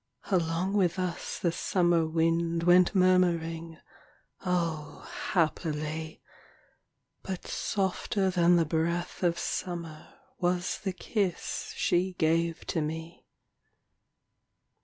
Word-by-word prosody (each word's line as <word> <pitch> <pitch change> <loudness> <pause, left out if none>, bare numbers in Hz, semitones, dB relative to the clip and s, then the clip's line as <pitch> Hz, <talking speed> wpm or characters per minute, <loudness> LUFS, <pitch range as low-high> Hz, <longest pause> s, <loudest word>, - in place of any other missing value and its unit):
Along 175 +1 +1
with 190 -4 +2
us 180 -2 -3
the 170 - +1
summer 175 -1 +2
wind 165 +1 +1
Went 180 +2 +5
murmuring 170 -3 +2 0.3
— - - -36
O, 170 -5 -2 0.2
happily! 155 -2 -1 0.5
— - - -44 0.3
But 190 -2 -5
softer 190 0 -1
than 175 -1 +4
the 170 -1 +3
breath 170 +3 -1
of 170 -2 +2
summer 170 -1 -4 0.3
Was 180 0 0
the 190 -2 -3
kiss 195 -1 -2
she 180 +2 +1
gave 165 0 +1
to 165 - -1
me. 160 +2 -6
170 Hz, 105 wpm, -29 LUFS, 165-180 Hz, 0.5 s, Went